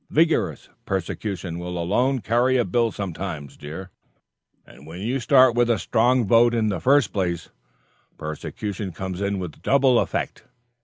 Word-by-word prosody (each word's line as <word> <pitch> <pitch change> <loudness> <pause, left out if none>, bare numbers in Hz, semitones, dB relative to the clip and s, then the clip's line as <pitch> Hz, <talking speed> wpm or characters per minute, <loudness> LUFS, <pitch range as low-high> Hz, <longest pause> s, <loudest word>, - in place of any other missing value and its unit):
Vigorous 160 +1 +1 0.2
persecution 95 -2 -3
will 90 0 -5
alone 125 +10 +1
carry 125 +4 +2
a 120 - +2
bill 115 +5 +1
sometimes, 85 -6 -5
dear; 80 +6 -8 0.7
and 70 - -16
when 85 +3 -8
you 120 +7 -1
start 130 0 +5
with 120 0 +2
a 115 - +3
strong 120 +1 +2
vote 115 +3 +4
in 110 -2 +1
the 95 -4 -2
first 140 - +3
place, 90 -4 -2 0.7
persecution 95 +5 -5
comes 95 +1 -5
in 100 0 -1
with 90 -4 -7
double 135 -3 +4
effect. - - -3
100 Hz, 150 wpm, -23 LUFS, 90-120 Hz, 0.7 s, start